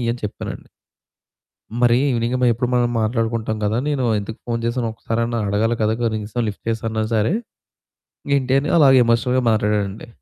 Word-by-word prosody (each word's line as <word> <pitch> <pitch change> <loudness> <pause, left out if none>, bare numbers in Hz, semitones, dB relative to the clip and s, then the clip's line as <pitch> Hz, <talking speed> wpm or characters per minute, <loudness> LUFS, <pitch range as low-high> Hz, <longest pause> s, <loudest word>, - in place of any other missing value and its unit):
అని 120 - -8
చెప్పానండి. 105 - -6 1.1
"మరి 120 -1 +5
ఇవెనింగ్ 120 0 0
మ - - +5
ఎప్పుడు 120 +2 -2
మనం 120 -1 +2
మాట్లాడుకుంటాం 110 0 -1
కదా! 110 +3 0
నేను 140 -3 0
ఎందుకు 110 +2 -6
ఫోను 115 -1 -2
చేశాను 120 0 -1
ఒక్కసారన్నా 115 +1 -2
అడగాలి 110 +4 +1
కదా! 110 +1 +2
కనీసం 110 +1 -2
లిఫ్ట్ 100 - -7
చేసిన్నా 110 -1 -2
సరే. 110 - +2 1.0
ఏంటి?" 130 -1 -1
అని 150 - -2
అలాగ 135 -3 +6
ఎమోషనల్‍గా 125 +2 +2
మాట్లాడడండి. 105 -1 -1
115 Hz, 145 wpm, -20 LUFS, 110-120 Hz, 1.1 s, అలాగ